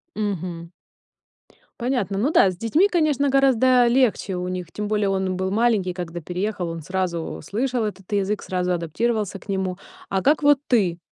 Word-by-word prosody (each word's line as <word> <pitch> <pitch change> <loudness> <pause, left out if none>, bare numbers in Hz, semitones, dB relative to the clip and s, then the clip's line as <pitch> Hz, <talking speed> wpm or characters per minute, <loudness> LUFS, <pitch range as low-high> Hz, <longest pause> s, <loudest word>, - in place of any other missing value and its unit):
Мгм. 180 -5 -4 1.1
Понятно. 235 -6 -1
Ну 270 +9 +1
да, 190 - +5
с 180 - -10
детьми, 300 - +3
конечно, 300 -6 +1
гораздо 260 -2 +4
легче 235 -6 +2
у 180 0 -3
них. 180 -2 -5
Тем 210 0 -4
более, 210 -2 +1
он 190 -1 -1
был 190 +1 -2
маленький, 210 -5 +1
когда 175 -1 -6
переехал, 180 +2 -3
он 165 -1 -5
сразу 180 -1 -3
слышал 245 - -1
этот 195 -1 -7
язык, 200 0 0
сразу 180 -1 -1
адаптировался 200 +4 -1
к - - -19
нему. 190 -2 -1 0.3
А 195 - 0
как 295 +4 +2
вот 290 -2 +5
ты? 190 -8 +2
200 Hz, 165 wpm, -23 LUFS, 180-240 Hz, 1.1 s, да